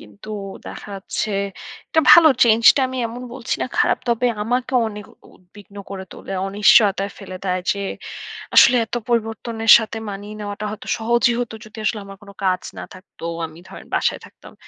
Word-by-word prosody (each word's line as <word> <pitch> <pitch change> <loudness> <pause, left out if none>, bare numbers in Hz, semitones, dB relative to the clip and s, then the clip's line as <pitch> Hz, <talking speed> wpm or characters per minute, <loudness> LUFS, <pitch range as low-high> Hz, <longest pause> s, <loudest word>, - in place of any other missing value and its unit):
কিন্তু 105 - -13 0.4
দেখা - - -9
যাচ্ছে, 210 +2 -4 0.6
এটা 320 - +3
ভালো। 335 -2 +9 0.2
চেঞ্জটা 230 +4 +6
আমি 260 0 -5
এমন 240 +2 -8
বলছি 255 -1 -3
না - - -1
খারাপ। - - +3
তবে 235 +1 +1 0.2
আমাকে 245 +4 -2 0.2
অনেক 210 -1 -9 0.3
উদ্বিগ্ন 200 +2 -18
করে 190 -1 -6
তোলে। - - -9 0.2
অনিশ্চয়তায় 200 0 +4
ফেলে 190 -2 -8
দেয় 185 -1 0
যে 200 - -6 0.8
আসলে 250 - +8
এত - - -6
পরিবর্তনের 225 -1 0
সাথে 225 0 -5
মানিয়ে 205 +2 -8
নেওয়াটা 205 0 -5
হয়তো 215 - -9
সহজই 235 +2 +2
হতো 235 -2 -5
যদি 215 +1 -15
আসলে 210 +1 0
আমার 195 0 -11
কোন 200 - -13
কাজ 185 -1 +1 0.2
না - - -6
থাকতো। 185 -1 -16 0.2
আমি 160 0 -15
ধরেন - - -11
বাসায় - - 0
থাকতাম। - - -16
215 Hz, 170 wpm, -20 LUFS, 195-235 Hz, 0.8 s, ভালো